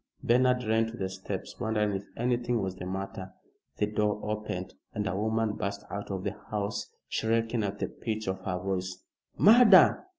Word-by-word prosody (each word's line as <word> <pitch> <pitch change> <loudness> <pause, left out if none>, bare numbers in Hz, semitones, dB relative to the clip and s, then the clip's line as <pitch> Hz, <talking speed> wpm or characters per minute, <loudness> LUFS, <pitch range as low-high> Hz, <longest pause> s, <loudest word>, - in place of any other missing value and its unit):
Bernard 125 +1 +3
ran 110 0 +2
to 115 +1 -8
the 95 - -1
steps, 95 0 -6
wondering 105 -1 +1
if 95 +1 -4
anything 120 0 +1
was 95 -2 -2
the 90 -1 -7
matter. 95 0 -5 0.4
The 105 - +2
door 105 0 0
opened, 105 -4 -4 0.2
and 105 - -1
a 90 - -1
woman 110 +1 0
burst 100 0 -3
out 100 0 -5
of 95 -2 -3
the 100 0 -2 0.2
house 105 -1 -2 0.2
shrieking 115 +1 0
at 100 0 -2
the - - -2
pitch 110 -2 -4
of 95 0 -2
her 90 -1 -2
voice 95 0 -3 0.3
"Murder! 215 - +7
105 Hz, 175 wpm, -29 LUFS, 95-115 Hz, 0.4 s, Murder